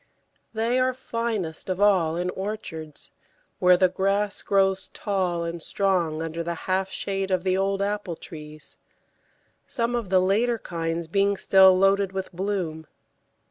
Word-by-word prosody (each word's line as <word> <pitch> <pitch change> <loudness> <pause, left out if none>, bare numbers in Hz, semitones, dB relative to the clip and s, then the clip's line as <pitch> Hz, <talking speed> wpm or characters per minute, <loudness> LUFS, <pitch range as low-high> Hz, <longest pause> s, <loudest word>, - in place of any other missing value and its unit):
They 230 +3 0
are 255 0 +1
finest 225 -10 -3
of 185 0 -2
all 185 -6 +3
in 180 +1 -1
orchards, 185 -7 -6 0.5
where 180 0 +6
the 185 - +4
grass 195 +2 0
grows 195 -1 +1
tall 185 -4 -1
and 170 0 -4
strong 175 -6 0
under 165 +1 -4
the 170 0 -3
half 190 0 0
shade 195 0 -3
of 185 -2 0
the 185 -1 +1
old 195 +1 0
apple 205 -4 -2
trees, 150 -2 -10 0.9
some 235 -1 -1
of 235 -5 -2
the 190 0 +4
later 220 +6 +2
kinds 165 -3 -3
being 200 +3 +1
still 190 -1 +6
loaded 195 0 +3
with 190 0 -4
bloom. 175 -4 -3
190 Hz, 145 wpm, -25 LUFS, 170-200 Hz, 0.9 s, where